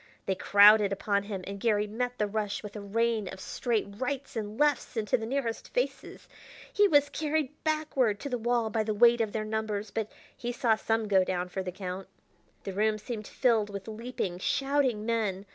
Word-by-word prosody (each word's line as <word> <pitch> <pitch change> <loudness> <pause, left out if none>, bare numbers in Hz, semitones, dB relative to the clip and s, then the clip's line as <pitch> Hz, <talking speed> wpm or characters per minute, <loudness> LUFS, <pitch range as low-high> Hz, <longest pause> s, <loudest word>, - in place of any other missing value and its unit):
They 195 - +1
crowded 205 +2 +6
upon 200 +1 0
him, 195 -3 -5
and 200 0 -6
Garry 210 -1 +2
met 245 +4 -3
the 210 - +1
rush 205 0 -3
with 210 0 -8
a 210 - -5
rain 220 +1 0
of 190 - -7
straight 230 +3 -1
rights 275 +1 -3
and 215 -1 -4
lefts 295 -4 +1
into 210 -2 +1
the 225 -1 -3
nearest 245 -3 -3
faces. - - -3 0.5
He 410 -2 +5
was 290 -5 +4
carried 305 -3 -1
backward 300 -9 +1
to 285 - -4
the 245 -2 -2
wall 235 -1 0
by 220 - +1
the 215 0 -1
weight 235 +2 +5
of 220 -2 -1
their 215 0 -2
numbers, 215 -1 -3
but 220 -1 -3 0.2
he 240 - -4
saw 235 -2 +2
some 225 0 -1
go 190 -2 +4
down 180 -1 -2
for 190 - -3
the 185 -1 -4
count. 185 0 -6 0.6
The 195 - -5
room 215 +2 +1
seemed 215 0 -6
filled 225 -5 +2
with 200 0 -7
leaping, 220 -5 -4
shouting 270 -2 +1
men. 210 -4 -1
220 Hz, 195 wpm, -29 LUFS, 205-245 Hz, 0.6 s, crowded